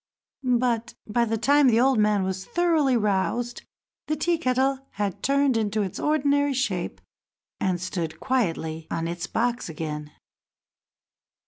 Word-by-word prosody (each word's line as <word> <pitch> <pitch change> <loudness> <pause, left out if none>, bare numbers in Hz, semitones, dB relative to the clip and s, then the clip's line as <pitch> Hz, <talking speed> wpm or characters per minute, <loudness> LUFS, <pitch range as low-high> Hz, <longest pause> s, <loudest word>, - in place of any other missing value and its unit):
But 240 -2 0
by 235 +3 +1
the 225 0 -1
time 285 +5 +4
the 230 -2 +4
old 260 -1 +4
man 210 -2 +3
was 190 0 -3
thoroughly 320 - +2
roused, 220 +3 0 0.5
the 305 - 0
Tea 335 +2 0
kettle 260 -1 +1
had 200 -3 -3
turned 275 -1 +2
into 215 -1 0
its 190 - -5
ordinary 285 -2 +2
shape, 190 - -2 0.6
and 185 -2 0
stood 170 -3 -4
quietly 165 -11 -1
on 165 0 -2
its 170 +2 -4
box 240 -3 -1
again. 150 -1 -5
235 Hz, 135 wpm, -25 LUFS, 190-270 Hz, 0.6 s, time